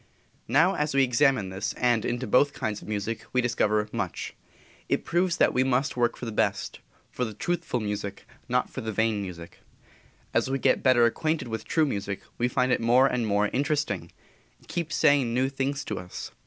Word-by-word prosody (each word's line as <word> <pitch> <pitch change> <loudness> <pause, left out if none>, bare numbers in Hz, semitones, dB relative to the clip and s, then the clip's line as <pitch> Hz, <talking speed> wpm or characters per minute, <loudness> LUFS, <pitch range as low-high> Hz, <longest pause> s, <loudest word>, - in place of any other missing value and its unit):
Now, 165 +7 +4
as 150 -3 -1
we 135 - +5
examine 130 -3 +3
into 95 0 -7
this, 95 - -2
and 120 -3 +1
into 120 +2 -2
both 140 +3 +3
kinds 105 -1 -3
of - - -12
music, 110 +1 -3
we 125 - +3
discover 110 -3 +1
much. 100 -7 -4 0.6
It - - 0
proves 175 0 +1
that - - +4
we 130 - +3
must 130 +1 +1
work 120 -1 +1
for - - -6
the 115 - -4
best; 105 - -1 0.3
for 125 - -2
the 110 -3 -4
truthful 170 - -2
music, 105 -2 -4 0.2
not - - +1
for - - -7
the 110 - -3
vain 110 0 +1
music. 85 -3 -8 0.7
As - - +1
we 135 - 0
get - - +2
better 130 -3 +5
acquainted 155 +3 -1
with 110 0 -4
true 160 -1 +2
music 100 -7 -3 0.2
we 120 - +2
find 125 0 +1
it - - +2
more 120 +3 +5
and 125 -4 0
more 105 0 +2
interesting 140 - -1 0.5
it - - -23
keeps 165 -3 -3
saying 135 -5 +3
new 130 +1 +2
things 135 +1 -2
to - - -3
us. 90 0 -8
125 Hz, 200 wpm, -27 LUFS, 105-135 Hz, 0.7 s, we